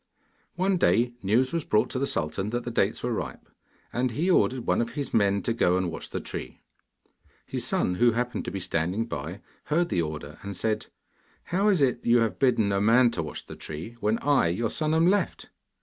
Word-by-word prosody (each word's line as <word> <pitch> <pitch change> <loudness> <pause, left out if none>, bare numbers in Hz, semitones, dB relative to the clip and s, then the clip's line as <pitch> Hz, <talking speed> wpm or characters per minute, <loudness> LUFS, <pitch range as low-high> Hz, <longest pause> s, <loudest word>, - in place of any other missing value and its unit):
One 190 +1 +1
day, 120 -7 +3
news 120 +7 +2
was 165 -2 0
brought 105 - +1
to 130 - -2
the 140 - 0
sultan 85 - -2
that 120 +2 -2
the 120 - -4
dates 105 -2 0
were 125 - -1
ripe, - - -5 0.5
and 125 +1 +1
he 160 +11 0
ordered 130 -7 +2
one - - +2
of 115 0 -3
his 140 0 -4
men 100 -2 +2
to 115 - 0
go 90 -5 +2
and 90 -2 -1
watch - - -7
the - - -3
tree. - - -7 0.8
His - - -4
son, 90 - +1
who 120 +5 +3
happened 125 +1 -2
to - - -3
be 95 - -4
standing 90 +4 -1
by, 90 -1 -6 0.2
heard 170 +3 +1
the 85 - +1
order, 75 -2 -6
and 100 0 -6
he - - -9
said: 110 +3 -1 0.6
'How 195 +4 0
is 190 -8 +4
it 125 -2 +1
that - - -3
you 120 - +6
have 110 -5 -1
bidden 115 -6 +3
a 100 0 +1
man 115 +3 +5
to 90 - -2
watch 75 -2 -7
the - - -9
tree, 80 +10 -7
when 110 +1 +1
I, 140 -11 +3
your 105 +7 -1
son, 155 0 0
am 165 +1 +4
left? 200 +3 +1
115 Hz, 225 wpm, -27 LUFS, 100-130 Hz, 0.8 s, you